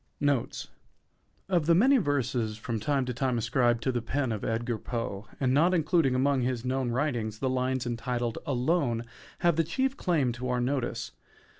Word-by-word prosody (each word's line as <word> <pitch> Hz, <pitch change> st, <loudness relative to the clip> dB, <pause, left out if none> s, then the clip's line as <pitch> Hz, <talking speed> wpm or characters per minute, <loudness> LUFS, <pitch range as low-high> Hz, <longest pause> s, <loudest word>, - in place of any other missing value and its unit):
NOTES 140 Hz, -, 0 dB, 0.8 s
Of 175 Hz, -5 st, +1 dB
the 170 Hz, -, +6 dB
many 265 Hz, +9 st, +5 dB
verses 125 Hz, -, 0 dB
from 115 Hz, 0 st, -3 dB
time 135 Hz, +3 st, 0 dB
to 125 Hz, -, -3 dB
time 125 Hz, 0 st, 0 dB
ascribed 120 Hz, 0 st, +1 dB
to 130 Hz, -, +1 dB
the 120 Hz, -1 st, -1 dB
pen 130 Hz, +2 st, -1 dB
of 110 Hz, -2 st, -3 dB
Edgar 115 Hz, 0 st, -1 dB
Poe, 115 Hz, -4 st, -4 dB
and 130 Hz, -2 st, +2 dB
not 170 Hz, +6 st, +4 dB
included 160 Hz, -5 st, +2 dB
among 135 Hz, +1 st, +2 dB
his 125 Hz, -1 st, -1 dB
known 130 Hz, -1 st, 0 dB
writings, 120 Hz, -4 st, -1 dB
the 130 Hz, +2 st, -1 dB
lines 130 Hz, 0 st, 0 dB
entitled 120 Hz, 0 st, -2 dB
"Alone" 130 Hz, -3 st, 0 dB, 0.4 s
have 170 Hz, -3 st, +3 dB
the 165 Hz, -, +4 dB
chief 260 Hz, -, -1 dB
claim 150 Hz, -9 st, +1 dB
to 125 Hz, +2 st, -4 dB
our 125 Hz, 0 st, +1 dB
notice. 120 Hz, -3 st, -2 dB
130 Hz, 175 wpm, -28 LUFS, 120-145 Hz, 0.8 s, the